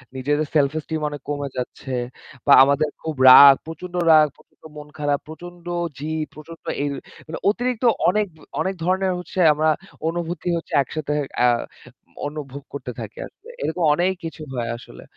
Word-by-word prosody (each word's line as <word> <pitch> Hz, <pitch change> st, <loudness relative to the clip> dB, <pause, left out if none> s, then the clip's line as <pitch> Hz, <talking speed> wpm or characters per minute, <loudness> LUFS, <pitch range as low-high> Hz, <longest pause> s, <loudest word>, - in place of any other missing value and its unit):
নিজেদের 145 Hz, +3 st, 0 dB
self 140 Hz, -2 st, +4 dB
esteem 155 Hz, 0 st, -4 dB
অনেক 145 Hz, -1 st, -8 dB
কমে 145 Hz, -1 st, -3 dB
যাচ্ছে। 130 Hz, +1 st, -5 dB, 0.5 s
বা 140 Hz, -, +8 dB
আমাদের 140 Hz, +2 st, +2 dB
খুব 160 Hz, -1 st, -4 dB
রাগ। 140 Hz, +1 st, +10 dB
প্রচন্ড 175 Hz, +3 st, -8 dB, 0.2 s
রাগ, 155 Hz, -1 st, +7 dB
প্রচন্ড -, -, -27 dB
মন 150 Hz, 0 st, -9 dB
খারাপ। 145 Hz, -1 st, 0 dB
প্রচন্ড 175 Hz, +2 st, -11 dB, 0.3 s
জি 150 Hz, -, -5 dB, 0.3 s
প্রচন্ড 160 Hz, +2 st, -12 dB, 0.2 s
ই -, -, 0 dB, 0.4 s
মানে 160 Hz, -, -6 dB
অতিরিক্ত 245 Hz, +2 st, -1 dB, 0.3 s
অনেক, 210 Hz, +3 st, +1 dB, 0.3 s
অনেক 190 Hz, +4 st, -1 dB
ধরণের 185 Hz, +2 st, +1 dB, 1.0 s
অনুভূতি 175 Hz, +1 st, -4 dB
হচ্ছে 165 Hz, -, -8 dB
আ -, -, +6 dB
একসাথে 150 Hz, +1 st, -4 dB, 0.2 s
অ্যা 125 Hz, -, +4 dB, 0.8 s
অনুভব 145 Hz, -2 st, -7 dB
করতে 125 Hz, -3 st, -5 dB
থাকি। 110 Hz, -2 st, -8 dB, 0.5 s
এরকম 180 Hz, -, -2 dB
অনেক 185 Hz, +3 st, +1 dB
কিছু 160 Hz, -1 st, -7 dB
হয় 120 Hz, -2 st, -3 dB
আসলে। 120 Hz, -, -13 dB
155 Hz, 145 wpm, -22 LUFS, 140-175 Hz, 1.0 s, রাগ